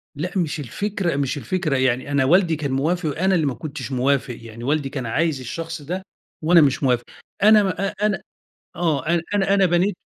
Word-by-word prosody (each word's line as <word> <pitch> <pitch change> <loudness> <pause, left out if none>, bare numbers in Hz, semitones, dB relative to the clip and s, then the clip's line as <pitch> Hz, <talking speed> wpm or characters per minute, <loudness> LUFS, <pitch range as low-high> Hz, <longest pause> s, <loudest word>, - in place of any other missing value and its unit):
لأ 170 +6 -3
مش 160 -3 -1
الفكرة 175 - -2
مش 140 0 -1
الفكرة 155 +1 -1
يعني 130 +2 0
أنا 140 -2 +2
والدي 170 +2 +4
كان 145 -3 -3
موافق، 160 +5 0
وأنا 185 +6 +1
اللي 160 -3 +1
ما 135 - 0
كنتش 140 +1 -6
موافق، 130 -1 0
يعني 115 +1 -10
والدي 145 0 0
كان 130 -4 -5
عايز 155 +4 0
الشخص 165 +6 -6
ده، 180 +6 -4 0.4
وأنا 170 +1 +6
مش 140 0 +2
موافق 125 -2 +2 0.4
أنا 215 -1 +7
ما 195 +1 -1
أ - - -9
أنا 210 -4 +1 0.6
آه 155 -5 0
أنا 170 0 +2
أنا 200 0 +2
أنا 195 -2 +4
بنيت 175 +3 +2
155 Hz, 195 wpm, -22 LUFS, 135-180 Hz, 0.6 s, أنا